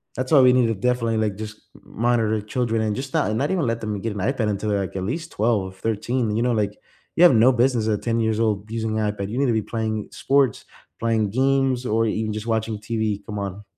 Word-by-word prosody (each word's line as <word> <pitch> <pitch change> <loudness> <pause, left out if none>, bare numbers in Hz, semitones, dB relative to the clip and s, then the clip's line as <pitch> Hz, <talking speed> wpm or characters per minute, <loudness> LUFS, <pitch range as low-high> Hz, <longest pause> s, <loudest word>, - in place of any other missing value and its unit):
That's 130 +1 -3
why 145 -4 +7
we 125 -1 +7
need 125 -2 +3
to 115 - 0
definitely, 115 +1 0
like, 105 -3 -1
just 105 0 -9
m - - -17 0.2
monitor 115 -3 +2
children 115 +1 -1
and 105 -1 -1
just 135 +1 -6
not - - +1
and 110 - -1
not 145 +6 0
even 180 -6 +1
let 115 0 -1
them 105 -2 -3
get 115 0 -3
an 105 - -6
iPad 115 +2 0
until 105 +1 -2
they're, 100 -1 +1
like, 95 -1 -5
at 95 - -2
least 160 - -4
12, 105 -4 0
13. 110 +2 -1
You 115 - +1
know, 125 - +2
like, 105 -2 0 0.4
you 170 - +4
have 175 - +8
no 115 +3 +6
business 120 -2 +1
at 105 -2 0
10 115 -1 0
years 110 -1 0
old 105 -2 0
using 110 -1 -2
a 105 -1 +1
iPad. 100 -1 -5
You 115 - -4
need 140 - +2
to 120 - +2
be 110 - +1
playing 110 -1 -3
sports, 135 -4 +1 0.3
playing 110 -2 +1
games 130 +1 +1
or 115 -1 +1
even 110 0 -2
just 110 +1 -5
watching 110 -1 -1
TV, 110 -2 -2
come 105 0 -6
on. 100 +1 -5
110 Hz, 255 wpm, -23 LUFS, 105-125 Hz, 0.4 s, have